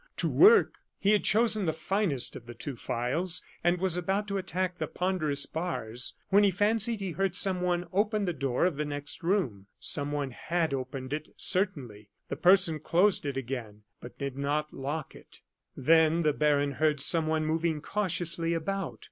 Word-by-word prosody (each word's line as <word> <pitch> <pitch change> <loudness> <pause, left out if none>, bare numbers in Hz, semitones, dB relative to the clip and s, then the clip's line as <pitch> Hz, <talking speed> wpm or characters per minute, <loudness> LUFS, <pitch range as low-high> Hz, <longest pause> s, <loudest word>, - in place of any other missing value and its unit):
to - - 0
work!" 440 +4 +5 0.2
He 200 - +2
had 210 - +3
chosen 215 -3 +2
the 160 - +1
finest 190 - -1
of 120 - -10
the 120 - -9
two 135 +3 -5
files, 160 +10 -1 0.2
and 175 +1 +3
was 185 -2 +1
about 195 +4 -1
to 200 0 -1
attack 185 0 -3
the - - -2
ponderous 155 -6 -1
bars, 130 -8 -3
when 200 +1 +5
he 200 - +5
fancied 215 +3 0
he 190 -2 -3
heard 190 +1 -1
someone 180 -2 0
open 210 +1 +1
the 175 - -1
door 135 0 0
of 175 -6 0
the 150 - 0
next 145 0 -4
room. 165 - -1
Someone 145 -2 0
had 165 +4 -1
opened 130 0 -4
it, 155 0 -5
certainly. 130 - -2 0.2
The - - -2
person 180 -4 +4
closed 175 +1 +2
it 140 - -3
again, 115 -5 -5 0.2
but 120 - -11
did 140 -2 -4
not 145 +2 -2
lock 145 +3 -4
it. - - -16 0.4
Then 160 +4 +4
the 150 -1 +2
baron 145 -1 +2
heard 150 +1 +1
someone 155 +2 +1
moving 160 0 0
cautiously 170 -3 -1
about. 195 +3 -3
160 Hz, 175 wpm, -29 LUFS, 140-185 Hz, 0.4 s, work